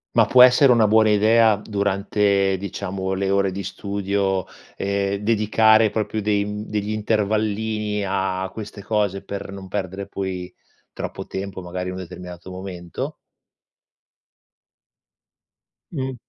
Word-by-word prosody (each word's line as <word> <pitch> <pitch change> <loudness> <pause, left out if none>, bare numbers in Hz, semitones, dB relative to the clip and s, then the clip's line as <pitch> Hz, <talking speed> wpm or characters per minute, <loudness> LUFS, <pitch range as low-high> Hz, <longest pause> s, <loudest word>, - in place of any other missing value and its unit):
Ma, - - +6
può 125 -1 +8
essere 130 +2 +6
una 115 -3 +5
buona 110 +1 +5
idea 110 +1 +4
durante, 100 -1 +1
diciamo, 95 0 -4
le 95 0 -1
ore 100 -1 +2
di 95 0 -5
studio, 100 -1 -1 0.3
ehm, 100 0 -1
dedicare 110 +1 +4
proprio 110 +1 -2
dei, 100 -1 +1
mhmm, 105 +1 -6
degli 105 0 -2
intervallini 105 0 -1
a 95 -1 -1
queste 105 -2 -8
cose 100 -2 -1
per 100 -1 -6
non 100 -1 -8
perdere 95 0 -4
poi 95 -2 -5 0.4
troppo - - -6
tempo 95 0 -5
magari 90 +1 -5
in 90 - -5
un - - -6
determinato 90 0 -9
momento? 90 -2 -6 2.8
Mh. 135 -4 -3
100 Hz, 125 wpm, -22 LUFS, 95-105 Hz, 2.8 s, può